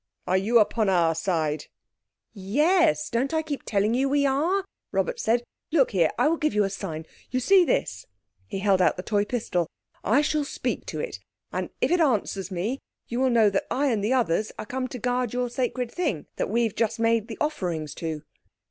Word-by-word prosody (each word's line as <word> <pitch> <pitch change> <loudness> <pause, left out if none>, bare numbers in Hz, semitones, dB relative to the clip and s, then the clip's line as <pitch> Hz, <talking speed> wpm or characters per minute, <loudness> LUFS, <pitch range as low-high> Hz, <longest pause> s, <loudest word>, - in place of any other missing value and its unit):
Are 185 - +1
you 210 +6 +3
upon 215 -1 +3
our 170 -3 +3
side?" 160 -3 -1 0.7
"Yes. 300 - +2
Don't 265 +5 -1
I 315 - +1
keep 295 -3 -4
telling 205 +1 +1
you 265 +3 +2
we 285 0 +2
are?" 330 +9 +1 0.3
Robert - - -1
said. 235 - +1 0.3
"Look 290 -5 +3
here. 175 -6 +3
I - - +3
will 330 +2 +2
give 305 -9 0
you 210 - +4
a 195 - -1
sign. 165 -5 -5 0.2
You 255 - 0
see 380 +8 +5
this." 95 - -1 0.4
He 105 - -4
held 195 -2 +3
out - - +3
the 180 - -5
toy 205 -1 +1
pistol. 180 -8 -1 0.4
"I 235 +8 +4
shall 300 0 +1
speak 280 - -3
to - - -4
it, 485 - -4 0.3
and - - -3
if - - +2
it 355 - +3
answers 205 - 0
me 205 +9 -2 0.3
you 240 - -2
will 260 0 +3
know 225 -4 +4
that 195 - -1
I 280 +2 +1
and 210 -3 0
the 225 +5 +2
others 220 -4 +1
are 215 - -5
come 255 +3 -3
to 250 - -7
guard 245 0 -1
your 245 -1 -1
sacred 250 -1 -2
thing—that 300 - -3
we've 230 0 +1
just 225 0 0
made 230 -1 +2
the 225 - -7
offerings 175 - -2
to." 160 -3 -3
230 Hz, 200 wpm, -26 LUFS, 195-275 Hz, 0.7 s, see